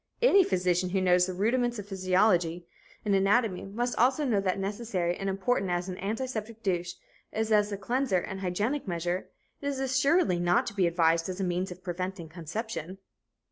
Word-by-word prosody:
Any 400 Hz, -5 st, +7 dB
physician 180 Hz, -, +1 dB
who 190 Hz, +1 st, 0 dB
knows 180 Hz, -1 st, +4 dB
the 185 Hz, -, -3 dB
first 180 Hz, -, -9 dB
rudiments 240 Hz, +2 st, +1 dB
of 205 Hz, -1 st, -7 dB
physiology 185 Hz, -3 st, +2 dB, 0.4 s
and 205 Hz, -, +2 dB
anatomy 195 Hz, +1 st, +2 dB
must 240 Hz, +5 st, -2 dB
also 265 Hz, +5 st, +3 dB
know 215 Hz, -7 st, +2 dB
that 185 Hz, -1 st, 0 dB
necessary 195 Hz, -3 st, -2 dB
and 195 Hz, -1 st, -3 dB
important 195 Hz, 0 st, 0 dB
as 175 Hz, +1 st, -1 dB
an 185 Hz, -, -6 dB
antiseptic 225 Hz, +1 st, -4 dB
douche 175 Hz, -2 st, -1 dB, 0.4 s
is 220 Hz, 0 st, -2 dB
as 210 Hz, -1 st, +3 dB
a 200 Hz, -, -3 dB
cleanser 240 Hz, +1 st, 0 dB
and 190 Hz, +2 st, -4 dB
hygienic 205 Hz, +9 st, -1 dB
measure, 175 Hz, +1 st, -2 dB, 0.3 s
it 285 Hz, -, -3 dB
is 280 Hz, -2 st, -2 dB
assuredly 265 Hz, -, +2 dB
not 175 Hz, 0 st, +2 dB
to -, -, -5 dB
be 190 Hz, -3 st, +2 dB
advised 165 Hz, 0 st, +2 dB
as 185 Hz, +1 st, -5 dB
a -, -, 0 dB
means 180 Hz, +1 st, -1 dB
of 180 Hz, 0 st, -10 dB
preventing 180 Hz, -1 st, -4 dB
conception. 180 Hz, +2 st, -5 dB
195 Hz, 185 wpm, -29 LUFS, 180-225 Hz, 0.4 s, Any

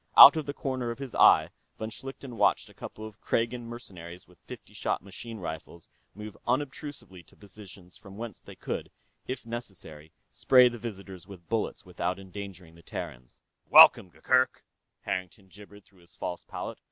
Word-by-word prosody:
Out -, -, +12 dB
of 155 Hz, -2 st, -3 dB
the 145 Hz, -, -3 dB
corner 130 Hz, -3 st, -3 dB
of 115 Hz, -, -4 dB
his 135 Hz, -4 st, -7 dB
eye, -, -, +6 dB, 0.3 s
von 110 Hz, +1 st, -5 dB
Schlichten 135 Hz, 0 st, -9 dB
watched -, -, +2 dB
a -, -, -19 dB
couple 110 Hz, -, -9 dB
of 110 Hz, -1 st, -12 dB
Kragan 115 Hz, +1 st, -1 dB
mercenaries 90 Hz, -7 st, -10 dB
with 90 Hz, 0 st, -22 dB
fifty -, -, -12 dB
shot -, -, -2 dB
machine 110 Hz, +4 st, -8 dB
rifles 85 Hz, -2 st, -8 dB, 0.3 s
move 105 Hz, 0 st, -9 dB
unobtrusively 130 Hz, -6 st, -3 dB
to -, -, -22 dB
positions 100 Hz, -2 st, -13 dB
from 100 Hz, -1 st, -13 dB
whence 115 Hz, -4 st, -7 dB
they -, -, -13 dB
could, -, -, -5 dB, 0.4 s
if 130 Hz, -1 st, -5 dB
necessary, 95 Hz, -10 st, -7 dB, 0.2 s
spray 125 Hz, -1 st, +6 dB
the 120 Hz, -1 st, -8 dB
visitors 95 Hz, -5 st, -8 dB
with 90 Hz, -4 st, -13 dB
bullets 115 Hz, -2 st, -2 dB
without 90 Hz, 0 st, -3 dB
endangering 95 Hz, -3 st, -9 dB
the 85 Hz, -, -17 dB
Terrans. 60 Hz, -6 st, -8 dB, 0.3 s
"Welcome, 90 Hz, -, +9 dB
Gurgurk," 130 Hz, +8 st, +1 dB, 0.4 s
Harrington 95 Hz, +1 st, -5 dB
gibbered 105 Hz, +1 st, -15 dB
through 95 Hz, -2 st, -25 dB
his 85 Hz, 0 st, -20 dB
false 90 Hz, -, -5 dB
palate. -, -, -7 dB
100 Hz, 165 wpm, -28 LUFS, 90-120 Hz, 0.4 s, Out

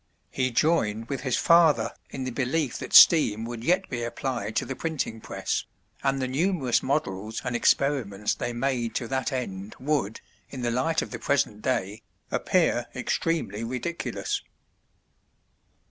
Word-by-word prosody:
He 130 Hz, -1 st, 0 dB
joined 115 Hz, -5 st, +1 dB
with 135 Hz, -, -3 dB
his 130 Hz, -2 st, 0 dB
father 170 Hz, -3 st, +4 dB, 0.2 s
in 135 Hz, -, -5 dB
the 130 Hz, -, -3 dB
belief 130 Hz, +2 st, -1 dB
that -, -, -7 dB
steam 115 Hz, -10 st, +7 dB
would 115 Hz, -1 st, -6 dB
yet 180 Hz, +7 st, +2 dB
be 125 Hz, -2 st, -4 dB
applied 120 Hz, -3 st, -3 dB
to -, -, +1 dB
the 135 Hz, -, -5 dB
printing 145 Hz, -9 st, -3 dB
press, -, -, -3 dB, 0.4 s
and 135 Hz, 0 st, +1 dB
the 130 Hz, -, -1 dB
numerous 140 Hz, -2 st, +1 dB
models 110 Hz, -6 st, -2 dB
and 125 Hz, -1 st, -2 dB
experiments 120 Hz, -6 st, +1 dB
they 120 Hz, -, -3 dB
made 120 Hz, -2 st, -1 dB
to 120 Hz, -, -2 dB
that 130 Hz, -1 st, -1 dB
end 105 Hz, -6 st, -4 dB
would, 135 Hz, -6 st, -1 dB, 0.3 s
in 130 Hz, -3 st, -6 dB
the 120 Hz, -, 0 dB
light 145 Hz, +7 st, +1 dB
of -, -, -9 dB
the -, -, -5 dB
present 110 Hz, -7 st, 0 dB
day, 110 Hz, -4 st, -1 dB, 0.3 s
appear -, -, +1 dB
extremely 115 Hz, -11 st, -1 dB
ridiculous. 170 Hz, -, -3 dB
130 Hz, 150 wpm, -26 LUFS, 115-145 Hz, 0.4 s, steam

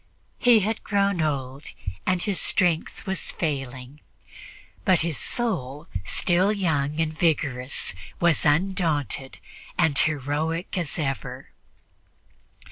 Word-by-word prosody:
He 240 Hz, -3 st, +6 dB
had 215 Hz, +3 st, -2 dB
grown 200 Hz, -3 st, +1 dB
old, 140 Hz, -2 st, -2 dB, 0.4 s
and 185 Hz, -1 st, +2 dB
his 200 Hz, -4 st, 0 dB
strength 170 Hz, -3 st, +1 dB
was 190 Hz, -1 st, 0 dB
failing, 135 Hz, -3 st, -4 dB, 0.8 s
but 185 Hz, -5 st, +4 dB
his 165 Hz, -2 st, -1 dB
soul, 165 Hz, -, -1 dB, 0.2 s
still 180 Hz, -, +2 dB
young 160 Hz, -7 st, 0 dB
and 160 Hz, -1 st, 0 dB
vigorous, 140 Hz, -, +1 dB, 0.3 s
was 170 Hz, -3 st, +3 dB
undaunted 150 Hz, -, +1 dB, 0.4 s
and 160 Hz, -5 st, +3 dB
heroic 155 Hz, +4 st, 0 dB
as 170 Hz, -5 st, -2 dB
ever. 135 Hz, -, -4 dB
160 Hz, 105 wpm, -25 LUFS, 140-185 Hz, 0.8 s, He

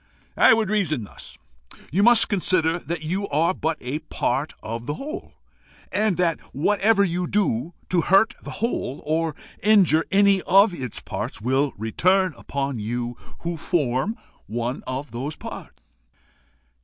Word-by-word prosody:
"I -, -, +7 dB
would 215 Hz, -3 st, 0 dB
reason 165 Hz, -, 0 dB
thus: 100 Hz, -, -11 dB, 0.5 s
You 185 Hz, +7 st, +2 dB
must 235 Hz, +1 st, +6 dB
consider 175 Hz, -4 st, +1 dB
that 170 Hz, -2 st, -5 dB
you 190 Hz, +6 st, -2 dB
are 160 Hz, +4 st, +2 dB
but 160 Hz, -2 st, -2 dB
a 130 Hz, +5 st, -3 dB
part -, -, -2 dB
of 115 Hz, +2 st, -5 dB
the 145 Hz, -, -2 dB
whole, 305 Hz, -, -7 dB, 0.6 s
and 210 Hz, -3 st, +1 dB
that 170 Hz, -3 st, +1 dB
whatever 200 Hz, +7 st, +3 dB
you 180 Hz, -1 st, -1 dB
do 170 Hz, -, 0 dB
to 180 Hz, -2 st, +2 dB
hurt 195 Hz, +6 st, +4 dB
the -, -, -9 dB, 0.2 s
whole, 145 Hz, -, -3 dB
or 160 Hz, 0 st, 0 dB, 0.3 s
injure 190 Hz, -6 st, +4 dB
any 200 Hz, -1 st, +4 dB
of 195 Hz, +2 st, +5 dB
its 130 Hz, -9 st, -5 dB
parts, -, -, -5 dB
will 130 Hz, +5 st, +1 dB
return 180 Hz, -, +2 dB
upon 140 Hz, -3 st, -3 dB
you 120 Hz, +3 st, -3 dB, 0.3 s
who 170 Hz, 0 st, -3 dB
form 150 Hz, -, 0 dB, 0.3 s
one 120 Hz, +4 st, -3 dB
of 130 Hz, +3 st, -4 dB
those 135 Hz, +6 st, -4 dB
parts." -, -, -9 dB
165 Hz, 145 wpm, -23 LUFS, 135-195 Hz, 0.6 s, I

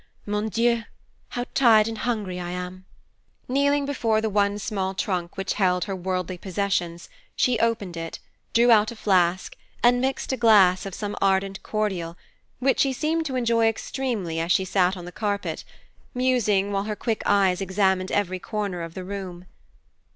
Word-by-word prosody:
Mon 210 Hz, +1 st, -1 dB
dieu, 235 Hz, +3 st, +2 dB, 0.5 s
how 245 Hz, 0 st, -3 dB
tired 225 Hz, -4 st, +5 dB
and 225 Hz, -1 st, -5 dB
hungry 210 Hz, -6 st, -2 dB
I 175 Hz, -1 st, -5 dB
am!" 180 Hz, +1 st, -6 dB, 0.6 s
Kneeling 280 Hz, +2 st, +2 dB
before 230 Hz, -6 st, +1 dB
the 220 Hz, -1 st, -1 dB
one 200 Hz, 0 st, +2 dB
small 195 Hz, -2 st, -3 dB
trunk 180 Hz, -3 st, -2 dB
which 195 Hz, -1 st, -1 dB
held 180 Hz, -3 st, +1 dB
her 195 Hz, -, -3 dB
worldly 185 Hz, -1 st, -3 dB
possessions, 180 Hz, -3 st, -2 dB, 0.3 s
she 245 Hz, -3 st, +2 dB
opened 215 Hz, -6 st, 0 dB
it, 165 Hz, 0 st, -5 dB, 0.3 s
drew 240 Hz, +1 st, +4 dB
out 215 Hz, -1 st, +5 dB
a -, -, -8 dB
flask, 185 Hz, -4 st, +1 dB, 0.3 s
and 245 Hz, +1 st, +5 dB
mixed 265 Hz, +1 st, -1 dB
a -, -, -1 dB
glass 200 Hz, -5 st, +5 dB
of 190 Hz, -, -7 dB
some 205 Hz, -1 st, -4 dB
ardent 195 Hz, 0 st, +1 dB
cordial, 190 Hz, -6 st, -2 dB, 0.4 s
which 265 Hz, +1 st, +1 dB
she 270 Hz, -1 st, +3 dB
seemed 320 Hz, +4 st, -1 dB
to 265 Hz, -, -4 dB
enjoy 230 Hz, -2 st, +2 dB
extremely 225 Hz, -7 st, -2 dB
as 165 Hz, +2 st, -1 dB
she 190 Hz, -, +3 dB
sat 185 Hz, 0 st, +1 dB
on 175 Hz, -, -8 dB
the 175 Hz, -, -8 dB
carpet, 205 Hz, 0 st, -3 dB, 0.5 s
musing, 225 Hz, -6 st, +2 dB
while 200 Hz, 0 st, -1 dB
her 210 Hz, 0 st, -3 dB
quick 225 Hz, 0 st, -2 dB
eyes 190 Hz, -2 st, +3 dB
examined 190 Hz, -1 st, +1 dB
every 185 Hz, -2 st, 0 dB
corner 200 Hz, -3 st, -3 dB
of 165 Hz, -1 st, -7 dB
the 185 Hz, -, -5 dB
room. 185 Hz, -2 st, -7 dB
200 Hz, 170 wpm, -24 LUFS, 185-230 Hz, 0.6 s, tired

